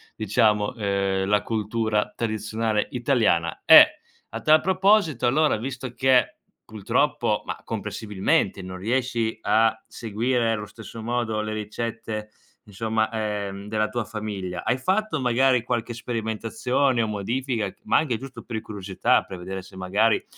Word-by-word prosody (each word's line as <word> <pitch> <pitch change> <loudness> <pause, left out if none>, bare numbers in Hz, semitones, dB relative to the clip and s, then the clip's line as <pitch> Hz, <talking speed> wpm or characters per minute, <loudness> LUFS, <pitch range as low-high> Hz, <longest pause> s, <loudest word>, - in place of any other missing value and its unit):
diciamo, 105 +1 +1
ehm, 100 -3 0
la 105 0 +3
cultura 110 -1 -1
tradizionale 110 -1 -1
italiana 115 -10 +1
e 305 - +8 0.3
a - - -5
tal 155 0 +5
proposito 185 - +3
allora 150 +1 +3
visto 130 +1 -6
che, 130 -1 +3 0.3
purtroppo, 110 -3 0
ma, - - -5
comprensibilmente, 100 -1 -1
non 95 0 -7
riesci 115 +1 -1
a 110 +2 +3
seguire 115 +1 -1
lo 105 -1 -5
stesso 110 +1 -10
modo 115 -2 -1
le 110 0 -4
ricette, 110 0 -4 0.4
insomma 110 +2 -1
ehm, 105 -2 -3
della 110 0 0
tua 120 +1 -3
famiglia, 105 -5 -5
hai 125 - +1
fatto 190 +3 0
magari 125 0 +3
qualche 120 -1 -2
sperimentazione 115 +3 -1
o 110 - 0
modifica 110 +1 -2
c - - -19
ma - - +3
anche 130 -8 0
giusto 125 -2 -10
per 110 -2 -5
curiosità, 100 -2 0
per 95 - -9
vedere 95 +2 -6
se 95 +1 -15
magari 100 +4 +1
110 Hz, 140 wpm, -24 LUFS, 105-125 Hz, 0.4 s, e